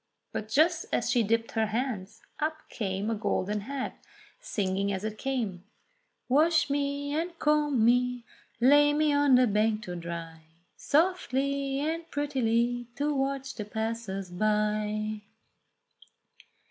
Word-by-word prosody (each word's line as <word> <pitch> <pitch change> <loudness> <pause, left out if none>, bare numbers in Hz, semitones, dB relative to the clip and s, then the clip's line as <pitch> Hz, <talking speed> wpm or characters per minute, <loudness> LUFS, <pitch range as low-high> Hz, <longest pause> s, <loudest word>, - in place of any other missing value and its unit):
But 215 - -4
just 320 +7 +3
as 240 0 +1
she 245 -1 +3
dipped 230 +1 0
her 220 -1 +1
hands, 220 -3 -3 0.2
up 310 0 -2
came 200 0 -2
a - - +1
golden 210 -1 -1
head 265 +4 -4 0.5
singing 200 - -1
as 190 0 -3
it 215 0 -4
came: 230 -10 -2 0.6
"Wash 310 +3 +3
me, 285 0 -1
and 335 +2 -2
comb 295 -7 +2
me, 245 0 +2 0.3
lay 290 +4 +6
me 300 0 +2
on 285 -2 +5
the 250 0 +6
bank 215 0 +1
to 180 -3 -5
dry 170 -1 -6 0.3
Softly 280 -4 +1
and 325 +2 -2
prettily 245 -4 0
to 290 +2 0
watch 270 0 -2
the 210 - -5
passers 215 -3 -4
by." 215 +2 0
245 Hz, 130 wpm, -28 LUFS, 210-285 Hz, 0.6 s, lay